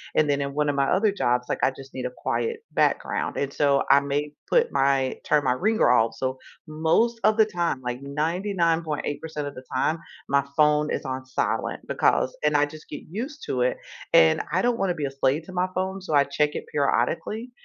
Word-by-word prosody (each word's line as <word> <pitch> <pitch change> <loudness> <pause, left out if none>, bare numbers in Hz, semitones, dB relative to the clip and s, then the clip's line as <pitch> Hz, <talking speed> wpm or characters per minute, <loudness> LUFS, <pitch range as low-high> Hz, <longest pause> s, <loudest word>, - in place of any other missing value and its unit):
and 150 -1 +3
then 140 0 +1
in 140 0 -3
one 150 0 0
of 145 - 0
my 135 -1 +1
other 200 +3 +3
jobs, 125 -8 0
like - - -2
I 130 - +4
just 135 0 -13
need 130 -1 -5
a 125 - -3
quiet 455 - -2
background, - - 0
and 140 -1 -1
so 140 -2 +2
I 140 +1 +7
may 145 +1 -2 0.2
put 485 -1 +3
my 135 -1 +2
turn 150 -2 +2
my 125 - +3
ringer 215 - +2
off. 115 -2 +3
So, 130 0 -2 0.3
most 165 +10 +1
of 215 +1 +4
the 220 - +6
time, 175 -9 -1
like 125 +1 -4
99.8% 160 -1 -1
of 140 - -8
the 130 - -9
time, 155 +5 +1 0.3
my 140 0 +2
phone 150 0 +3
is - - -3
on 130 0 -4
silent 130 - -2
because 130 - +1
and 150 -1 +3
I 145 - +4
just 155 +1 -12
get 145 - -7
used 265 - -6
to 125 - -1
it, 125 - +1 0.4
and 80 -1 +6
I 185 +3 +2
don't 240 -1 +2
wanna 185 -3 0
be 150 -3 -2
a 135 - -3
slave 135 +3 0
to 185 - -10
my 180 +1 +1
phone. 190 +1 -2
So, 170 -5 -5
I 140 - +6
check 150 +1 0
it - - -4
periodically, 215 - -1
150 Hz, 215 wpm, -25 LUFS, 135-180 Hz, 0.4 s, I